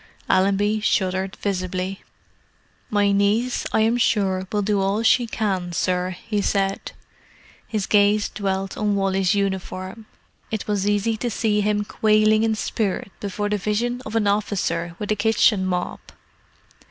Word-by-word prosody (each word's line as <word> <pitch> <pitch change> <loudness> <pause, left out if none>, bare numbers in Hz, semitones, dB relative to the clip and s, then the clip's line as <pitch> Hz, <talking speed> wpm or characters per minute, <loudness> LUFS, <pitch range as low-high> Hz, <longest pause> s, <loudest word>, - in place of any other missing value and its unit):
Allenby 200 +3 +2
shuddered 190 -2 0
visibly. 185 -1 -3 0.9
"My 205 -1 +2
niece, 205 +5 +1
I 220 - +2
am 225 +2 +3
sure, 190 -5 +1
will 210 -1 0
do 205 0 +1
all 200 +3 0
she 235 +1 +4
can, 190 -6 -2
sir," 180 +1 -1
he 210 -2 0
said. 195 -1 -1 0.7
His 215 -3 -2
gaze 205 0 +3
dwelt 195 -2 -3
on 210 -1 0
Wally's 195 -1 +1
uniform; 190 +1 -3 0.4
it 220 -2 -3
was 205 -1 0
easy 210 +2 +1
to 240 - -2
see 215 -2 +1
him 210 0 0
quailing 215 0 +3
in 225 -1 +1
spirit 205 -3 -2
before 205 +1 -3
the 210 0 0
vision 235 +5 -1
of 215 - -7
an 225 -2 +2
officer 185 -5 -1
with 210 0 -4
a - - +3
kitchen 215 -3 +3
mop. 180 -1 -3
205 Hz, 145 wpm, -22 LUFS, 190-215 Hz, 0.9 s, she